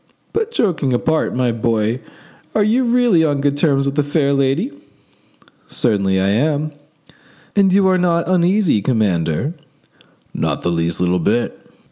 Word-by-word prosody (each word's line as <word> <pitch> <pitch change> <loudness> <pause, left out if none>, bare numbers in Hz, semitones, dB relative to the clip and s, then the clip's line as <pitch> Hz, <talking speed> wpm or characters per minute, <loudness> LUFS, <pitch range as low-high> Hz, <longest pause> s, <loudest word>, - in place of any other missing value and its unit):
But 450 0 -1
joking 170 - 0
apart, 155 +5 0
my 125 -1 +1
boy, 115 0 -1 0.6
are 215 - +3
you 230 +5 +2
really 235 -8 +3
on 145 -3 0
good 140 0 0
terms 140 -2 +1
with 140 - -1
the 150 - +1
fair 145 -1 0
lady?" 140 - 0 1.0
"Certainly 100 -5 0
I 95 +1 +1
am." 150 +7 0 0.8
"And 195 -2 +4
you 195 0 +4
are 185 -1 +2
not 170 -2 +1
uneasy, 185 - +2
commander?" 100 - 0 0.8
"Not - - -2
the 85 - 0
least 85 0 -1
little 90 0 +1
bit." 110 +8 0
140 Hz, 145 wpm, -18 LUFS, 110-180 Hz, 1.0 s, And